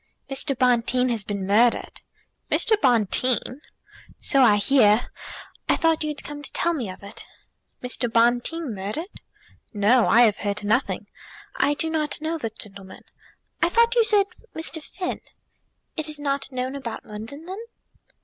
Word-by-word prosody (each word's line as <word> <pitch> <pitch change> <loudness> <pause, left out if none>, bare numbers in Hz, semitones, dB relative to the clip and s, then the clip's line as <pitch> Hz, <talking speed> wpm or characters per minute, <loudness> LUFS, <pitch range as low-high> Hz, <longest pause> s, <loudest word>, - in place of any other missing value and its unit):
"Mr. 270 0 0
Bonteen 250 0 +2
has 230 -4 -1
been 200 -1 -4
murdered!" 225 +5 +2 0.5
"Mr. 445 - +3
Bonteen!" 250 +2 +2 0.6
"So 275 -4 +2
I 225 -5 +6
hear. 215 0 +4 0.6
I - - +5
thought 325 -1 +1
you - - -2
had 300 - -6
come 295 0 -7
to 290 - -7
tell 340 - +1
me 250 - -3
of 185 - -10
it." 200 +1 -9 0.6
"Mr. 250 -1 -1
Bonteen 240 +5 +1
murdered! 210 - -5 0.5
No; 215 +4 +4
I 235 - +6
have 215 -4 +4
heard 205 0 -2
nothing. 220 +6 0 0.5
I 290 - +2
do 325 - -1
not 310 -2 -2
know 320 +1 -3
the 230 - -3
gentleman. 195 -3 -10 0.6
I 340 - +4
thought 465 +5 +4
you 475 -2 +4
said 420 -3 +4 0.3
Mr. 320 0 -2
Finn." 360 +4 -5 0.7
"It 315 -1 -2
is 305 - -3
not 280 -1 -2
known 255 +1 -3
about 265 -5 -6
London, 225 +9 -9
then?" 380 +3 -6
255 Hz, 155 wpm, -24 LUFS, 220-310 Hz, 0.7 s, I